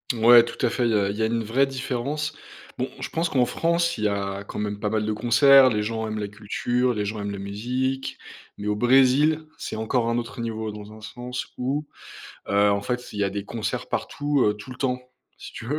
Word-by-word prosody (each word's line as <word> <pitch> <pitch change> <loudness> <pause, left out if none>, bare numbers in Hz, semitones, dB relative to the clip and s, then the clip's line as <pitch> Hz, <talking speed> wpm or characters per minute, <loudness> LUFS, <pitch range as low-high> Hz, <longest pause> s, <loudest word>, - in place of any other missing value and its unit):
Ouais, 115 +1 +8
tout 120 +2 -6
à - - +3
fait, 125 - 0
il - - +1
y - - +2
a 100 -1 +2
il - - -6
y - - -2
a - - +3
une 115 0 -1
vraie 130 +6 +2
différence. 135 +3 -3 0.5
Bon, - - -1
je - - -4
pense 165 +1 -1
qu'en 125 -3 +3
France, 170 +2 0
il 105 - -2
y - - +5
a 100 0 -2
quand - - -8
même 105 -1 -3
pas 105 - -1
mal 110 0 0
de 110 - 0
concerts, 130 +4 +6
les 105 -2 0
gens 110 0 -2
aiment 110 0 -4
la 105 -1 -2
culture, 120 +4 -1
les 105 -1 -1
gens 105 +1 -4
aiment 100 - -3
la 100 - -5
musique, 125 +7 -3 0.4
mais 105 - -5
au 105 - +1
Brésil, 135 +6 +4
c'est - - -5
encore 115 +2 0
un 115 - +1
autre 120 +1 -4
niveau. 110 -1 -3
Dans 105 0 -10
un 110 - -13
sens 125 +3 -6
où, 140 +4 -1 0.6
heu, 100 +1 +4
en 100 0 0
fait, 125 +1 -3
il 105 - -4
y - - +3
a 100 - 0
des 100 0 -4
concerts 110 0 -4
partout, 145 -2 0
heu, 105 - +2
tout 105 +5 -11
le 125 - -8
temps, 125 -2 -1 0.4
si - - -10
tu - - -8
veux, 145 +6 -2
115 Hz, 245 wpm, -24 LUFS, 105-130 Hz, 0.6 s, Ouais